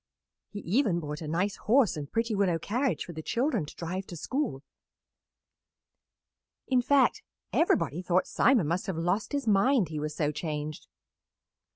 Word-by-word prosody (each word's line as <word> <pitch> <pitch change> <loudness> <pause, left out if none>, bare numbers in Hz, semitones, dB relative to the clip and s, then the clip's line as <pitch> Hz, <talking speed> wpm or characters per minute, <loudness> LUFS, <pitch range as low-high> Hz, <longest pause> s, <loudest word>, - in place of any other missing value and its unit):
He 205 - -7
even 200 -2 +1
bought 150 -1 -5
a 155 - -5
nice 180 +6 -1
horse 235 -1 +3
and 145 -2 -6
pretty 230 0 0
willow 195 -4 +2
carriage 245 - -1
for 175 - -8
the 160 - -6
children 235 - 0
to - - -11
drive 185 +3 -4
to 175 - -8
school; 235 - -2 2.0
in 255 -2 +3
fact, 275 +2 +3 0.3
everybody 170 - +2
thought 180 0 +1
Simon 240 - +3
must 170 +4 -1
have 190 -4 -2
lost 175 +6 -1
his 285 -1 -2
mind, 215 - +3
he 155 -1 -4
was 150 0 -4
so 150 -2 0
changed. 150 -1 -5
185 Hz, 160 wpm, -29 LUFS, 160-235 Hz, 2.0 s, horse